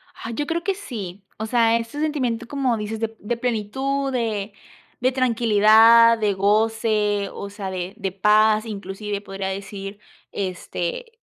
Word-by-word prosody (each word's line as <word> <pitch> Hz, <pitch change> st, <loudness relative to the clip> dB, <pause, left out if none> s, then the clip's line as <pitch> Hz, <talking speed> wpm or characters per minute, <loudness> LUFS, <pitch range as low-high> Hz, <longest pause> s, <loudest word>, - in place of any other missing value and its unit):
Ah, 225 Hz, -, -7 dB
yo 290 Hz, +6 st, -2 dB
creo 335 Hz, +1 st, -2 dB
que 390 Hz, +1 st, 0 dB
sí. 205 Hz, -, -7 dB
O 220 Hz, -, -3 dB
sea, 230 Hz, 0 st, +3 dB
ese 230 Hz, +5 st, -6 dB
sentimiento, 250 Hz, -7 st, -1 dB
como 265 Hz, -4 st, 0 dB
dices 215 Hz, +1 st, -4 dB
de 225 Hz, 0 st, -3 dB
de 235 Hz, +3 st, -3 dB
plenitud, 265 Hz, +4 st, -1 dB
de 215 Hz, -4 st, -2 dB, 0.5 s
de 255 Hz, +2 st, +2 dB
tranquilidad, 230 Hz, -1 st, +5 dB
de 210 Hz, -2 st, +1 dB
goce, 210 Hz, 0 st, +1 dB
o 200 Hz, -, -7 dB
sea, 200 Hz, -1 st, -6 dB
de 185 Hz, +1 st, -4 dB
de 195 Hz, -3 st, -3 dB
paz. 215 Hz, +2 st, +3 dB
Inclusive 200 Hz, -1 st, -5 dB
podría 195 Hz, -1 st, -5 dB
decir, 195 Hz, +1 st, -6 dB, 0.3 s
este, 195 Hz, -, -4 dB
220 Hz, 150 wpm, -22 LUFS, 200-235 Hz, 0.5 s, tranquilidad